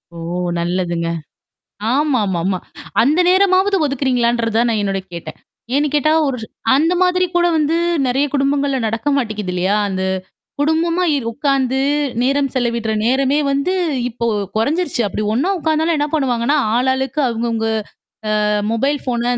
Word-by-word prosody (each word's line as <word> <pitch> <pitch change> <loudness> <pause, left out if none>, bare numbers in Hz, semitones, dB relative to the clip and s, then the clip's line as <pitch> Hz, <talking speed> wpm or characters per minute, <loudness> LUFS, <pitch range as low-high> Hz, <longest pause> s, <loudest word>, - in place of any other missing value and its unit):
ஓ! - - -8 0.4
நல்லதுங்க. 175 -1 -1 0.8
ஆமாமாமா. 205 - +1 0.4
அந்த 295 +8 +3
நேரமாவது 380 +1 +3
ஒதுக்கிறீங்களான்றத 240 -4 0
தான் 235 0 +3
நான் 220 -2 0
என்னோட 195 -1 -1
கேட்டேன். 170 - -7 0.4
ஏன்னு 295 +1 +2
கேட்டா 300 +1 +3 0.2
ஒரு 265 -2 -2 0.4
அந்த 320 +5 +2
மாதிரி 365 0 +3
கூட 350 0 +4
வந்து 305 +1 +1 0.3
நெறைய 270 +3 +1
குடும்பங்கள்ல 280 0 +1
நடக்க 225 +6 -1
மாட்டேங்குது 215 -7 -2
இல்லையா? 185 +3 +1
அந்த? 190 -1 -2 0.6
குடும்பமா 330 +4 +1 0.3
உட்கார்ந்து 270 0 0 0.5
நேரம் 275 +1 +1
செலவிடுற 235 -3 0
நேரமே 265 +3 +2
வந்து 280 +7 0 0.4
இப்போ 235 0 -4 0.3
கொறைஞ்சருச்சு. 285 +4 0
அப்படி 210 +2 -3
ஒண்ணா 270 +11 +1
உட்கார்ந்தாலும் 320 +1 +1
என்ன 295 +1 0
பண்ணுவாங்கன்னா, 270 -1 +1 0.2
ஆளாளுக்கு 265 +3 0
அங்கவங்க 230 -1 -1 0.8
அ - - +2 0.3
மொபைல் 275 +5 +1
ஃபோன் 240 -2 -1
265 Hz, 125 wpm, -18 LUFS, 230-295 Hz, 0.8 s, கூட